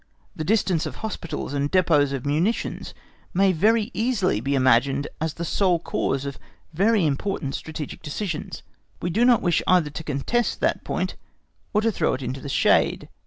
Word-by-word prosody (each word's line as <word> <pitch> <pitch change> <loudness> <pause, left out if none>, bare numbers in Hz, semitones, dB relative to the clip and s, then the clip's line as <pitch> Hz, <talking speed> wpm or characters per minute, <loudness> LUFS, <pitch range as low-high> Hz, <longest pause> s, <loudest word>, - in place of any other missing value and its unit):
The 155 - -3
distance 185 -3 +1
of - - -7
hospitals 170 -10 -5
and 145 0 -1
depôts 155 -7 +3
of 135 -1 -4
munitions 165 +11 -1 0.4
may 195 +1 +4
very 215 +6 +2
easily 215 - +1
be 140 +3 0
imagined 135 +2 +3
as 160 -1 -2
the 170 - -4
sole 180 +1 +2
cause 140 -4 -2
of 140 -1 -6 0.3
very 200 +2 +3
important 145 -1 -2
strategic 155 -1 -6
decisions. 155 +1 -5 0.4
We 175 - -2
do 225 +7 +2
not 245 -2 +5
wish 175 -2 +2
either 175 -5 +3
to 160 - -6
contest 155 - -1
that - - 0
point - - -3 0.5
or 210 - +2
to 225 +1 +2
throw - - 0
it 130 - -7
into 130 +2 -4
the 140 - -6
shade. - - +2
165 Hz, 170 wpm, -24 LUFS, 140-200 Hz, 0.5 s, not